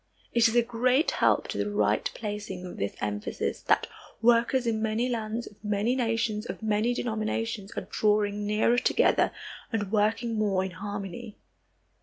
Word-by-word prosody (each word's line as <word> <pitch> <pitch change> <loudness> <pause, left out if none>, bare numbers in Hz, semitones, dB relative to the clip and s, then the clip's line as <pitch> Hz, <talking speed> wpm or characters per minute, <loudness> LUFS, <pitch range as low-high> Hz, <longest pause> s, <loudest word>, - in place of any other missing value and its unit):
It 235 -1 +5
is 225 - -1
a 240 - +5
great 250 +5 +2
help - - +2
to - - -3
the - - 0
right 205 - +1
placing 205 -4 -5
of 180 - -8
this 100 0 -2
emphasis 105 0 -3
that - - +2 0.3
workers 240 +2 +3
in 220 -2 0
many 220 +2 0
lands, 230 -1 -2
of 210 - -15
many 210 +4 +1
nations, 230 -3 0
of - - -6
many 220 +3 +1
denominations, 220 -2 -2
are - - -4
drawing 210 -1 +1
nearer 220 +3 +3
together - - +3 0.4
and 205 -4 -2
working 225 +2 +1
more 195 -3 +2
in 190 - -5
harmony. 205 +3 -6
215 Hz, 160 wpm, -28 LUFS, 205-235 Hz, 0.4 s, It